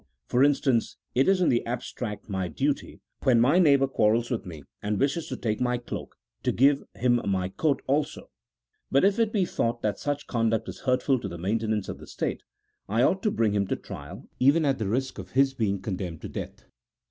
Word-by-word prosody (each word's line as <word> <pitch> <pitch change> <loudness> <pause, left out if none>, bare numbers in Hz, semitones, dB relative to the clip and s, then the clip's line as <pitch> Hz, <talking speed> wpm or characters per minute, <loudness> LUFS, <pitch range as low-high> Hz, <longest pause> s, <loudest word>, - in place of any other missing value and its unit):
For 125 - +3
instance: 135 -4 +2 0.2
it 130 +2 +3
is 190 -1 +4
in 175 - +4
the 120 - +2
abstract 120 -2 -5
my 95 -3 -2
duty 80 - -2 0.2
when 125 -3 +4
my 140 +10 +5
neighbour 140 -6 +5
quarrels 115 -2 +1
with 115 -5 -2
me 80 -5 -8 0.2
and 105 0 -1
wishes 145 +4 0
to 130 - -4
take 110 -1 -2
my 125 0 +1
cloak, 120 - -7 0.3
to - - +1
give 140 +3 +4
him 120 -1 +2
my 95 -2 0
coat 140 +6 0
also; 145 +2 -1 0.6
but 135 +6 +4
if 200 +2 +3
it 225 -2 +2
be 200 -4 +2
thought 120 -7 -2
that 105 -2 -1
such 145 0 -2
conduct 115 -2 0
is - - -7
hurtful 130 +1 +1
to 105 - -5
the 85 -2 -7
maintenance 110 +2 -1
of - - -6
the - - -12
state, - - -3 0.5
I 115 +4 +2
ought 190 +6 +2
to 215 - +2
bring 115 - +1
him 100 -1 +1
to - - 0
trial, 70 0 -9
even 145 +5 +4
at 135 -3 +1
the 110 - -1
risk 130 +1 -1
of 95 -1 -9
his 135 +1 +4
being 105 -6 0
condemned 90 -4 -5
to - - -6
death. - - -7
120 Hz, 210 wpm, -27 LUFS, 105-140 Hz, 0.6 s, my